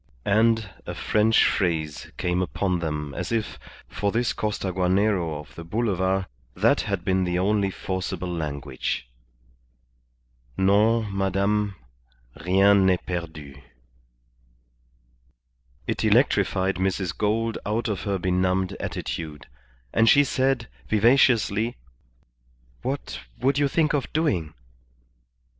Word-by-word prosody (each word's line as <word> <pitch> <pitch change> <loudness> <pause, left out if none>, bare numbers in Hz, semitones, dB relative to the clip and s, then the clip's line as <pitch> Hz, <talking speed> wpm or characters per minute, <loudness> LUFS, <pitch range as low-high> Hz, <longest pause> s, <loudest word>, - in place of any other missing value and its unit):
And 110 +1 +3 0.2
a - - -4
French 110 +1 +3
phrase 80 -6 -1
came 90 0 0
upon 90 0 -1
them 75 -3 -3
as - - -4
if, 115 -2 -2 0.3
for 100 -1 -2
this 120 +2 0
Costaguanero 95 -4 0
of 75 - -12
the 85 - -9
Boulevard, 95 -1 0 0.3
that - - +3
had 100 -3 -3
been 95 0 +2
the 90 -1 0
only 100 +1 +1
forcible 95 -1 -4
language 70 -6 -3 1.5
"Non, 105 +2 +3
Madame. 100 +1 0 0.7
Rien 95 +2 +5
n'est 90 -2 +1
perdu." 80 -6 -6 2.2
It - - -2
electrified 95 +1 +2
Mrs. 95 -2 -1
Gould 110 +2 0
out 110 +3 -1
of 105 -4 -2
her 100 -1 -1
benumbed 95 +1 0
attitude, 75 -3 -5 0.5
and 115 0 +4
she 145 - +7
said, 130 -3 0 0.2
vivaciously 115 -1 +3 1.0
"What - - -4 0.2
would 135 +2 +2
you 145 - +3
think 155 +2 +1
of 140 -4 -1
doing?" 95 - 0
95 Hz, 110 wpm, -25 LUFS, 90-110 Hz, 2.2 s, she